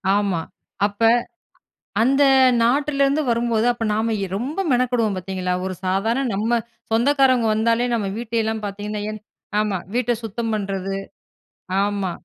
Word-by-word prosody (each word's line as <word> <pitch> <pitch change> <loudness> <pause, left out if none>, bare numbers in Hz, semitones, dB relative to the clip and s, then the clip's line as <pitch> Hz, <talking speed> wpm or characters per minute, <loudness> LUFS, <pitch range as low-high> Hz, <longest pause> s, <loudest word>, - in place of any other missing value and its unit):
ஆமா. 200 -5 0 0.4
அப்ப 205 +1 -4 1.0
அந்த 270 +4 +4 0.4
நாட்டிலருந்து 280 +3 +2
வரும்போது, 235 -1 +1
அப்ப 235 - -5
நாம 220 +1 0 0.2
ரொம்ப 275 - -4
மெனக்கெடுவோம், 245 -4 +1
பாத்தீங்களா? 185 0 -3
ஒரு 190 - -3
சாதாரண 220 +8 +1
நம்ம 225 +4 +1 0.3
சொந்தக்காரங்க 255 +1 +3
வந்தாலே, 230 +2 +2
நம்ம 215 -4 0
வீட்டையெல்லாம் 225 -2 -2
பாத்தீங்கன்னா 205 +1 -4
என் 215 -1 -8 0.4
ஆமா. 210 -3 0 0.2
வீட்ட 245 0 +1
சுத்தம் 225 +1 -3
பண்றது 195 -2 -2 0.9
ஆமா. 200 -2 -1
225 Hz, 120 wpm, -22 LUFS, 205-240 Hz, 1.0 s, அந்த